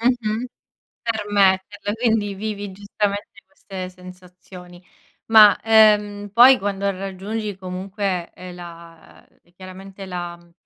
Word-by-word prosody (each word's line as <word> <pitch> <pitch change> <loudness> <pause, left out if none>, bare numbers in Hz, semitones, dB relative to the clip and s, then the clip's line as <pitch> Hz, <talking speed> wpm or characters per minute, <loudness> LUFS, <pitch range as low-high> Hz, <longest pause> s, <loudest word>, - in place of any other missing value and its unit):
Mh-mh. 235 -1 0 0.6
Per 225 -2 -2
metterla, 200 +1 +1
quindi 220 -3 0
vivi 205 0 -5
giustamente 205 +1 -4
queste 190 -1 -9
sensazioni. 180 -1 -14 0.5
Ma, 215 -2 +8
ehm, 210 -2 +4
poi 255 +3 +8
quando 200 0 -2
raggiungi 195 +2 -5
comunque, 185 0 -4
ehm, 180 -1 -10
la, 170 -1 -13
ehm - - -34
e 175 - -31
chiaramente 190 +1 -11
la 175 -2 -6
mhmm, 170 0 -23
195 Hz, 120 wpm, -21 LUFS, 185-210 Hz, 0.6 s, Ma